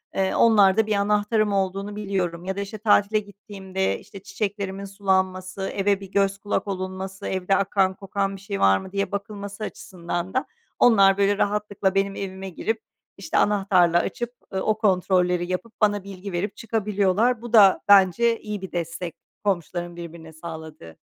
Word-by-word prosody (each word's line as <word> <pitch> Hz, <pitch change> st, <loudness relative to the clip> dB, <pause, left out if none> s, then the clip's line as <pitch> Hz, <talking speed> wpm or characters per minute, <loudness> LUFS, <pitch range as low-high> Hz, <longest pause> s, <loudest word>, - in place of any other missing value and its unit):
eee, 190 Hz, 0 st, +1 dB
onlarda 215 Hz, -1 st, +5 dB
1 215 Hz, -, +1 dB
anahtarım 210 Hz, +1 st, +1 dB
olduğunu 195 Hz, +1 st, -1 dB
biliyorum. 185 Hz, -4 st, -2 dB
Ya 190 Hz, +1 st, -2 dB
da, -, -, -4 dB
işte, 200 Hz, +2 st, -6 dB
tatile 210 Hz, 0 st, +3 dB
gittiğimde, 195 Hz, -2 st, -4 dB
işte, 195 Hz, -, -12 dB
çiçeklerimin 200 Hz, -2 st, -4 dB
sulanması, 190 Hz, -1 st, -1 dB
eve 200 Hz, 0 st, +1 dB
bir 195 Hz, -1 st, -11 dB
göz 195 Hz, 0 st, +1 dB
kulak 205 Hz, +1 st, -2 dB
olunması, 190 Hz, 0 st, -5 dB
evde 190 Hz, +1 st, 0 dB
akan, 195 Hz, -1 st, +2 dB
kokan 195 Hz, 0 st, -2 dB
bir 195 Hz, -, -12 dB
şey 200 Hz, 0 st, -4 dB
var 95 Hz, 0 st, +5 dB
mı 190 Hz, -, -8 dB
diye 200 Hz, +1 st, -2 dB
bakılması 200 Hz, +1 st, -5 dB
açısından 185 Hz, -5 st, -5 dB
da 260 Hz, -, 0 dB, 0.3 s
onlar 195 Hz, -5 st, +6 dB
böyle 200 Hz, 0 st, +2 dB
rahatlıkla 205 Hz, -2 st, 0 dB
benim 195 Hz, 0 st, +1 dB
evime 190 Hz, 0 st, -6 dB
girip, 220 Hz, +5 st, -3 dB, 0.4 s
işte, 195 Hz, -, -2 dB
anahtarla 190 Hz, -4 st, +3 dB
açıp, 240 Hz, +6 st, -3 dB, 0.2 s
eee, 190 Hz, -, 0 dB
o 215 Hz, +2 st, 0 dB
kontrolleri 180 Hz, -3 st, +1 dB
yapıp, 215 Hz, +5 st, -4 dB
bana 205 Hz, -2 st, +2 dB
bilgi 195 Hz, 0 st, -8 dB
verip 185 Hz, +3 st, -2 dB
çıkabiliyorlar. 215 Hz, +1 st, +1 dB
Bu 240 Hz, -1 st, -8 dB
da 200 Hz, -4 st, +7 dB
bence 205 Hz, +4 st, +5 dB
iyi 210 Hz, -2 st, -5 dB
bir 190 Hz, -, -7 dB
destek 170 Hz, 0 st, -4 dB, 0.3 s
komşuların 175 Hz, -3 st, -2 dB
birbirine 170 Hz, -1 st, -9 dB
sağladığı. 160 Hz, -, -9 dB
195 Hz, 160 wpm, -24 LUFS, 185-205 Hz, 0.4 s, da